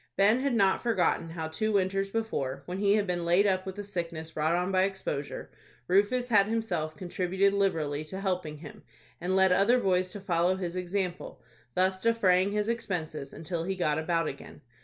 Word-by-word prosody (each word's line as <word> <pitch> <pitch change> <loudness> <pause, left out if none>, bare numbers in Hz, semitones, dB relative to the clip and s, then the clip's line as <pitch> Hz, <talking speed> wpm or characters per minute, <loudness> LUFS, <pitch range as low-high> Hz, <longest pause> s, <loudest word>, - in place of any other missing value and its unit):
Ben 210 +5 +4
had 270 -2 0
not 195 -3 +3
forgotten 185 -7 +1
how 165 -1 -4
two 215 +7 -1
winters 195 0 +1
before, 145 - -3
when 180 +4 -5
he 200 0 +3
had 210 -1 +1
been 175 -2 -2
laid 175 +4 +3
up 190 -1 +1
with 190 - -6
a 205 - -4
sickness 170 -5 -5
brought 160 +1 +1
on 180 +2 0
by 185 0 +3
exposure, 190 -7 -4 0.4
Rufus 205 +7 +2
had 205 -4 +4
himself 180 -9 -2
contributed 190 +2 0
liberally 160 -7 0
to 190 +5 -6
help 185 -2 -1
him, 150 0 -9 0.4
and 180 +2 0
led 190 -1 +5
other 205 +7 +4
boys 185 -4 +1
to 205 - -6
follow 180 -1 +1
his 180 -2 -4
example, 180 -6 -3 0.3
thus 185 +1 +1
defraying 200 -4 +3
his 210 0 -1
expenses 175 -11 -3
until 165 +1 -4
he 190 +2 -2
got 160 -4 0
about 165 0 0
again. 140 - -8
185 Hz, 185 wpm, -29 LUFS, 170-200 Hz, 0.4 s, led